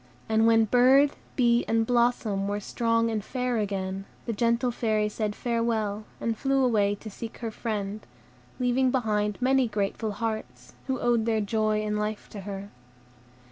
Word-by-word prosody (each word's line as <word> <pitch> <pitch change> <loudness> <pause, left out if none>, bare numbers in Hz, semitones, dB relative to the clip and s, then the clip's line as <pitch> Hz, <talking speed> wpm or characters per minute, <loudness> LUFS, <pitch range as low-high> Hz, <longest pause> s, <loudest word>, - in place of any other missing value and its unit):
And 220 0 +3
when 225 -1 +5
bird, 260 +5 +5 0.2
bee, 240 -2 +3
and 225 0 +2
blossom 235 -5 +1
were 205 +1 -1
strong 230 +2 0
and 215 -2 -2
fair 250 0 -1
again, 195 -1 -3 0.2
the 230 - -2
gentle 235 +3 +1
Fairy 215 -3 0
said 210 0 -3
farewell, 225 -3 -1
and 230 -1 -1
flew 270 +2 +1
away 205 -4 +2
to 215 +2 -9
seek 225 +3 -8
her 230 -2 -4
friend, 210 -2 -4 0.6
leaving 255 +1 +2
behind 210 -5 0
many 260 0 +3
grateful 210 0 -2
hearts, 220 +1 -5
who 260 -2 -1
owed 235 -2 +1
their 220 -1 +2
joy 215 0 0
and 210 0 -1
life 210 0 -3
to 210 - -8
her. 200 +1 -7
225 Hz, 160 wpm, -27 LUFS, 210-240 Hz, 0.6 s, when